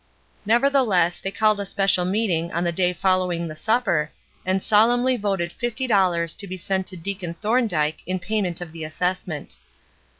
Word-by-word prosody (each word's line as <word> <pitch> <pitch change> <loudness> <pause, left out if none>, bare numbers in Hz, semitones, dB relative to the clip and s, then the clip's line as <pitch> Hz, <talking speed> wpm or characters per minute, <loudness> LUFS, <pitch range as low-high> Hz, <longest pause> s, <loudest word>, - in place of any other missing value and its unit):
Nevertheless, 230 -8 +3
they 195 - -3
called 215 +1 +2
a 200 - -2
special 195 -2 +2
meeting 180 -4 0
on 170 +2 0
the 170 - +1
day 180 +1 +1
following 180 -2 0
the 155 - -7
supper, 195 -5 +1 0.3
and 185 +1 0
solemnly 245 +4 +4
voted 195 -6 -2
fifty 240 +4 -3
dollars 180 -7 +2
to 200 - -7
be 185 0 -5
sent 190 +1 -1
to 185 - -7
Deacon 180 -1 -4
Thorn 230 +7 +1
dyke 155 -4 -1
in 185 +1 0
payment 185 -2 -2
of 175 -2 -7
the 165 -1 -7
assessment. 175 -1 -3
185 Hz, 170 wpm, -23 LUFS, 170-215 Hz, 0.3 s, solemnly